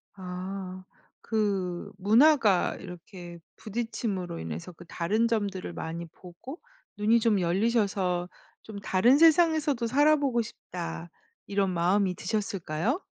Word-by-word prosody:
아 185 0 -6 0.4
그 195 -5 -2
문화가 220 - +4
이렇게 175 -1 -10 0.2
부딪힘으로 215 -5 -4
인해서 80 - -6
그 175 +1 -14
다른 205 +8 0
점들을 200 -6 -2
많이 170 +1 -5
보고 180 - -11 0.4
눈이 220 +3 +3
좀 220 -3 +2
열리셔서 190 -1 +1 0.4
'좀 210 -2 -8
다른 225 +8 +4
세상에서도 315 -6 +4
살아보고 280 -1 +3
싶다.' 175 -6 -7 0.4
이런 200 -1 0
마음이 180 +2 +1
드셨을까요? 200 - -2
200 Hz, 260 characters per minute, -28 LUFS, 180-230 Hz, 0.4 s, 문화가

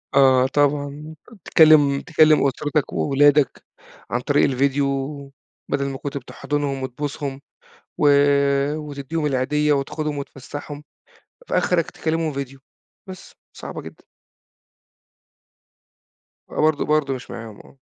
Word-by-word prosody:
آه 130 -2 +5
طبعًا، 145 +2 -1 0.3
تكلِّم 150 -3 +5
تكلِّم 155 -3 +4
أسرتك 145 +2 -2
وولادك، 145 0 +2 0.5
عن 120 - -1
طريق 145 +3 +2
الڤيديو، 140 +2 +1 0.9
بدل 140 -1 0
ما 135 - -5
كنت 145 +1 -5
بتحضنهم 140 +1 -3
وتبوسهم، 135 +1 -5 0.6
و 150 - +4 0.7
وتدّيهم 150 +1 -4
العيدية 150 +2 +1
وتاخدهم 145 +1 -2
وتفسّحهم، 145 +2 -8 0.6
فأخرك 170 -3 +1
تكلِّمهم 160 -1 -2
ڤيديو، 135 0 -6 0.5
بس، 185 -1 -11 0.2
صعبة - - -8
جدًا. - - -13 2.5
آه - - -3
برضه 155 -1 +2
برضه 150 -2 +1
مش 130 -2 -7
معاهم، 115 -3 -8
آه. - - -17
145 Hz, 105 wpm, -22 LUFS, 135-150 Hz, 2.5 s, آه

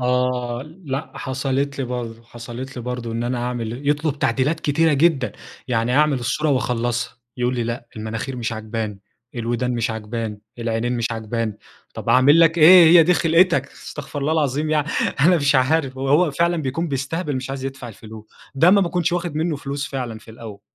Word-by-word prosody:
آه، 125 -1 0 0.2
لأ 140 +2 -4
حصلت 135 +1 -2
لي 135 - -1
برضه، 120 -2 -5
حصلت 120 +3 -9
لي 120 - -5
برضه 125 -2 -4
إن 115 +1 -2
أنا 125 0 -1
هاعمل 120 +3 -4
يطلب 150 -1 0
تعديلات 150 +5 0
كتيرة 160 +2 +2
جدًا، 140 -2 +2 0.4
يعني 120 +2 +1
اعمل 150 -3 +3
الصورة 150 +5 -1
واخلصها 120 -2 -1 0.2
يقول 125 0 0
لي: 120 - -1
"لأ، 120 +1 -4
المناخير 115 +5 -4
مش 120 -1 -3
عجباني، 110 -2 -5 0.3
الودان 120 +1 -1
مش 115 -1 -1
عجباني، 110 -1 -5 0.2
العينين 115 +1 -1
مش 115 - 0
عجباني" 110 -1 -3 0.4
طب - - -7
اعمل 145 +6 +6
لك 165 0 +4
إيه! 175 +2 +9
هي 165 +1 +8
دي 180 +3 +3
خلقتَك 165 -4 +3
استغفر 145 0 -8
الله 150 +3 0
العظيم 150 0 0
يعني 150 -1 +1 0.3
أنا 175 +5 +5
مش 145 -2 +2
عارف 130 0 +2
ه - - -5
هو 145 +5 +3
فعلًا 170 +4 +1
بيكون 155 +6 -2
بيستهبل 140 +3 -2
مش 130 +1 -5
عايز 135 -1 -5
يدفع 135 -2 -6
الفلوس، 110 0 -11 0.3
ده 165 +6 +5
ما 200 - +5
باكونش 175 -2 0
واخد 175 -3 -2
منه 160 -1 0
فلوس 140 0 -4
فعلًا 125 -5 -4
في 110 - -15
الأول، 110 -3 -10
130 Hz, 180 wpm, -21 LUFS, 120-150 Hz, 0.4 s, إيه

